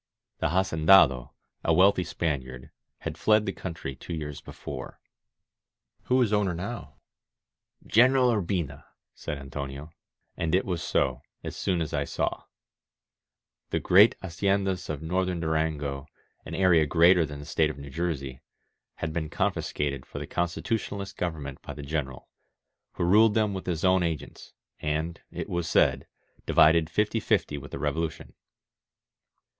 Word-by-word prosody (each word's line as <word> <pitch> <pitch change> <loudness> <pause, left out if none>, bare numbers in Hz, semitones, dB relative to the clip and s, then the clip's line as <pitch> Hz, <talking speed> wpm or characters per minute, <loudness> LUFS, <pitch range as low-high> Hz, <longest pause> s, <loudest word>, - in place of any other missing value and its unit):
The - - +1
haceridado, 80 -7 +4 0.3
a 80 - +3
wealthy 95 +1 +5
Spaniard, 65 -7 -4 0.3
had - - -5
fled 105 0 +4
the 95 - -1
country 85 -7 -6
two 85 +6 -6
years 75 -2 -6
before. 65 -3 -8 1.1
"Who 130 +1 +3
is 105 -3 -1
owner 100 -4 +1
now?'* 90 - -6 0.9
"General 125 +2 +5
Urbina," 85 -9 -2 0.3
said 75 - -5
Antonio. 70 +2 -7 0.4
And 85 +1 0
it 95 - +1
was 90 -3 -2
so, 65 0 0 0.2
as - - -5
I - - -8
soon 80 -6 -1
saw. - - -2 1.2
The - - 0
great 100 +5 +6
haciendas 95 +1 -1
of 75 -1 -4
Northern 90 +1 -1
Du 80 -1 -2
rango, 75 -3 -1 0.4
an - - -5
area 85 -5 +4
greater 85 +3 +5
than 75 -2 -5
the 70 - -9
State 75 +1 +1
of 75 - -6
New 70 -1 -9
Jersey, 70 -5 -3 0.5
had 80 -1 -4
been 80 -2 -2
confiscated 70 -4 -2
for - - -9
the - - -4
Constitutionalist 100 +3 -3
govern 80 -4 -3
ment 70 0 -8
by - - -8
the 75 - -8
General, 70 -3 -4 0.7
who - - -2
ruled 105 +5 +5
them 105 -2 +2
with 95 -1 -6
his 85 -1 -1
own 95 0 +4
agents, 80 -5 -4 0.3
and, 80 +3 -2
it - - -5
was 85 -2 -2
said, - - +3 0.4
divided 80 0 +5
fifty 105 +6 +1
fifty 100 -10 0
with 75 - -10
the - - -6
Revolution. 80 -2 -3
80 Hz, 145 wpm, -27 LUFS, 75-95 Hz, 1.2 s, great